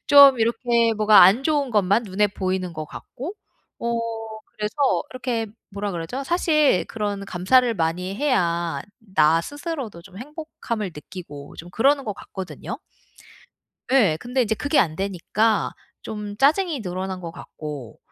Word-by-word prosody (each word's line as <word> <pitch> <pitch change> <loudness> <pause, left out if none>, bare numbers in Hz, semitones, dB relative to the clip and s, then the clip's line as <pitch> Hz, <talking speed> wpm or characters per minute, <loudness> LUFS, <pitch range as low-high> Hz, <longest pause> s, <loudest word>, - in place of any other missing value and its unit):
좀 280 -3 +8
이렇게 235 0 +2
뭐가 215 0 +7
안 195 +8 +6
좋은 290 -3 +1
것만 210 +1 +2
눈에 205 +1 +1
보이는 185 -2 -2
것 155 -1 -6
같고 290 - -8 0.5
어 235 0 -1 0.6
그래서 210 0 -3 0.4
이렇게 245 -3 -2 0.2
뭐라 200 +1 -3
그러죠? 175 +11 -4
사실 305 - +3
그런 205 -2 -3
감사를 230 +7 +3
많이 180 +2 -1
해야 175 - 0 0.3
나 155 0 +5
스스로도 290 - -6
좀 190 +1 -15
행복함을 245 - -5
느끼고 150 -3 -10
좀 170 - -9
그러는 275 +7 +3
것 210 - -2
같거든요. 190 -2 -7 1.1
예. 210 -13 +4
근데 250 +1 0
인제 220 -2 0
그게 290 +5 +1
안 155 -4 +3
되니까 200 +4 0 0.3
좀 210 -1 -6
짜증이 305 - +3
늘어난 185 0 -4
것 170 -2 -6
같고 145 -8 -8
210 Hz, 280 characters per minute, -23 LUFS, 180-255 Hz, 1.1 s, 좀